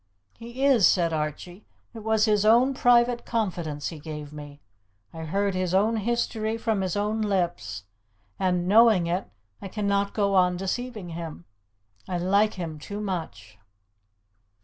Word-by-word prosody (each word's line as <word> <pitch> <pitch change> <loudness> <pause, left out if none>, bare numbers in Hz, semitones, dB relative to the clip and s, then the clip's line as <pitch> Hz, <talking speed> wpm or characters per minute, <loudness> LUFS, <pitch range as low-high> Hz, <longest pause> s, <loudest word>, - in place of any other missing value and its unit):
"He 235 +4 -4
is," 250 -9 +6
said 170 -3 +2
Archie. 160 +5 -4 0.3
"It 230 - -8
was 220 0 +2
his 210 -2 +2
own 240 +5 +5
private 245 -1 +3
confidence 170 -10 -2
he 160 - -9
gave 150 -1 -8
me. 145 -1 -10 0.5
I 160 0 -7
heard 200 +5 0
his 185 0 -1
own 220 +4 +2
history 225 0 -1
from 225 -3 -1
his 185 -2 -2
own 210 +2 -1
lips, 170 - -2 0.6
and, 180 -2 0
knowing 215 -3 +5
it, 175 +3 -2 0.3
I - - -6
cannot 200 0 -1
go 200 -2 +1
on 180 -2 +3
deceiving 210 +1 -4
him. 165 - -7 0.6
I 180 - -1
like 200 +4 +2
him 165 -4 -6
too 200 +7 -7
much." 160 - -6
195 Hz, 150 wpm, -26 LUFS, 170-220 Hz, 0.6 s, is